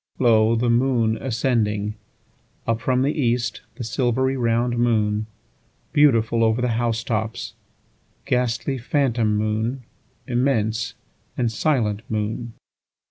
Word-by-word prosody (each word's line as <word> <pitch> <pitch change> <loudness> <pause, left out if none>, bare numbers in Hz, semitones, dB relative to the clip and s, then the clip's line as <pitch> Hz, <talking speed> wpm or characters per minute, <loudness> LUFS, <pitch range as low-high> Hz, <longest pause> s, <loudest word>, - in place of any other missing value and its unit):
2Lo! 115 -2 +4
the 120 - +1
moon 120 -2 +2
ascending! 110 -4 0 0.7
Up 115 0 0
from 130 +1 +1
the 145 +3 +1
east, 120 -5 0
the 120 - -6
silvery 130 +3 0
round 120 -1 +1
moon; 110 -3 +1 0.7
Beautiful 115 -6 +4
over 110 +1 +2
the 125 0 +1
house 115 0 0
tops, 110 -1 -3 0.7
ghastly 125 +1 0
phantom 120 -5 +1
moon; 110 +4 -1 0.4
Immense 120 -2 0 0.4
and 120 -3 +1
silent 110 -5 0
moon. 110 +2 -3
115 Hz, 110 wpm, -23 LUFS, 110-125 Hz, 0.7 s, 2Lo